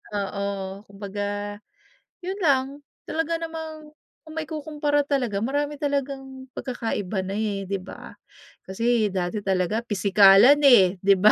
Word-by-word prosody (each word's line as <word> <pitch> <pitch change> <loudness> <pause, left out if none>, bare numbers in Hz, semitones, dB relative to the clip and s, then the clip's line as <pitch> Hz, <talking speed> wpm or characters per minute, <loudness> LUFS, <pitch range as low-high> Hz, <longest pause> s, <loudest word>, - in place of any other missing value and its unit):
oo. 200 0 -2 0.4
Kumbaga 205 +1 -5 0.6
'yon 380 +2 -4
lang, 265 -4 +3 0.4
talaga 325 +1 -1
namang 320 -2 -7 0.3
kung 315 0 -11
maikukumpara 300 -2 -1
talaga 245 -8 0
marami 290 +3 -1
talagang 270 -2 -3
pagkakaiba 225 -6 -3
na, 195 +1 -4
eh, 205 -2 -2
di 200 - 0
ba? - - -11 0.5
Kasi 230 +2 +1
dati 185 +2 -2
talaga 190 +3 0
pisikalan 200 +6 +6
eh, 195 -9 +6
di 195 0 +5
ba, 215 +2 +7
230 Hz, 120 wpm, -24 LUFS, 200-290 Hz, 0.6 s, ba